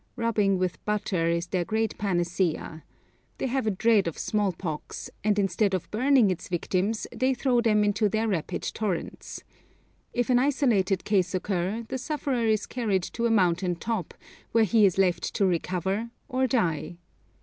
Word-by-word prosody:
Rubbing 215 Hz, -4 st, +1 dB
with 180 Hz, -3 st, -2 dB
butter 205 Hz, -5 st, 0 dB
is 170 Hz, 0 st, 0 dB
their 180 Hz, 0 st, -1 dB
great 220 Hz, +3 st, -1 dB
panacea. 175 Hz, -4 st, -1 dB, 0.5 s
They -, -, -2 dB
have 260 Hz, -2 st, -1 dB
a -, -, +4 dB
dread 210 Hz, -1 st, +3 dB
of 165 Hz, -, -4 dB
small 205 Hz, -2 st, 0 dB
pox, 160 Hz, -3 st, -6 dB
and 210 Hz, 0 st, +2 dB
instead 195 Hz, 0 st, +1 dB
of 185 Hz, -, -5 dB
burning 245 Hz, -2 st, +4 dB
its 180 Hz, -, -5 dB
victims 185 Hz, +4 st, -1 dB
they 260 Hz, +1 st, +1 dB
throw 245 Hz, -1 st, +2 dB
them 215 Hz, -3 st, +3 dB
into 205 Hz, +1 st, +2 dB
their 220 Hz, +2 st, 0 dB
rapid 185 Hz, -7 st, -2 dB
torrents. 205 Hz, -6 st, -4 dB, 0.7 s
If 245 Hz, +1 st, 0 dB
an 245 Hz, -, +5 dB
isolated 240 Hz, -9 st, +2 dB
case 190 Hz, -3 st, +1 dB
occur, 190 Hz, +4 st, -2 dB
the 260 Hz, -, -4 dB
sufferer 260 Hz, -4 st, -1 dB
is 215 Hz, -1 st, +1 dB
carried 210 Hz, -7 st, -1 dB
to 235 Hz, 0 st, 0 dB
a -, -, 0 dB
mountain 180 Hz, -4 st, +2 dB
top, 195 Hz, -1 st, -4 dB, 0.4 s
where 225 Hz, 0 st, +5 dB
he 215 Hz, 0 st, +5 dB
is 185 Hz, -, -1 dB
left 180 Hz, -3 st, +1 dB
to 200 Hz, -, +2 dB
recover 185 Hz, +5 st, -1 dB, 0.2 s
or 260 Hz, +1 st, +1 dB
die. 175 Hz, -, -1 dB
205 Hz, 165 wpm, -27 LUFS, 180-230 Hz, 0.7 s, an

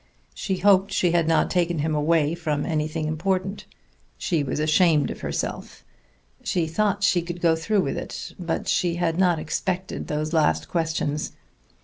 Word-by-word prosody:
She 190 Hz, -2 st, -2 dB
hoped 195 Hz, +1 st, +4 dB
she 175 Hz, -, +2 dB
had 170 Hz, -2 st, +2 dB
not 165 Hz, -, +2 dB
taken 175 Hz, -2 st, +1 dB
him 155 Hz, +1 st, 0 dB
away 155 Hz, 0 st, +2 dB
from 155 Hz, -4 st, -2 dB
anything 155 Hz, -1 st, -1 dB
important. 185 Hz, +5 st, -2 dB, 0.5 s
She 165 Hz, -5 st, 0 dB
was 140 Hz, -, -3 dB
ashamed 155 Hz, -1 st, +3 dB
of -, -, -7 dB
herself; -, -, -4 dB, 0.6 s
she 175 Hz, -2 st, 0 dB
thought 200 Hz, +4 st, 0 dB
she 180 Hz, -3 st, +4 dB
could 175 Hz, +1 st, -6 dB
go 165 Hz, -2 st, +3 dB
through 200 Hz, +5 st, +1 dB
with 140 Hz, -, -2 dB
it, -, -, -7 dB
but 170 Hz, -2 st, -3 dB
she 175 Hz, -2 st, +1 dB
had 170 Hz, -1 st, 0 dB
not 180 Hz, -3 st, +4 dB
expected 180 Hz, +4 st, -3 dB
those 155 Hz, +2 st, -2 dB
last 80 Hz, -, +2 dB
questions. 160 Hz, -2 st, -1 dB
165 Hz, 160 wpm, -24 LUFS, 155-180 Hz, 0.6 s, hoped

